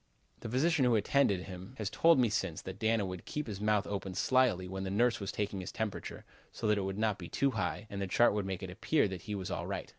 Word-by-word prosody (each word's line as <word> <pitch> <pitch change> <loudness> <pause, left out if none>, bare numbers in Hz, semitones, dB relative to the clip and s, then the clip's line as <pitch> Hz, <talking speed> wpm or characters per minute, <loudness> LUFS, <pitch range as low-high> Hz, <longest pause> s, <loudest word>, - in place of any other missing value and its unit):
The 115 - -6
physician 145 +5 +2
who 120 -2 +4
attended 105 -3 +2
him 95 +5 -9
has 110 - -2
told 165 -1 +5
me 125 -2 +4
since 100 -6 -1
that 95 +1 -7
Dana 110 -2 +2
would 90 -1 -6
keep 150 0 -4
his 105 -3 -6
mouth 105 -1 +2
open 95 -2 -4
slyly 120 -8 +2
when 95 +1 -4
the 95 - -3
nurse 120 +5 +2
was 100 -2 -3
taking 100 -2 -2
his 95 - -6
temperature 110 -3 -4 0.3
so - - -6
that 105 -1 +3
it 95 - -2
would 95 0 -3
not 110 -2 0
be 85 - -7
too 140 0 +1
high 100 -1 -2
and 100 -1 -5
the 100 - -1
chart 120 +5 +4
would 100 -2 -1
make 95 0 -4
it 95 - -5
appear 115 +8 +2
that 95 -3 -6
he 105 - -1
was 95 -2 -4
all - - -3
right. - - -4
105 Hz, 265 wpm, -32 LUFS, 95-115 Hz, 0.3 s, told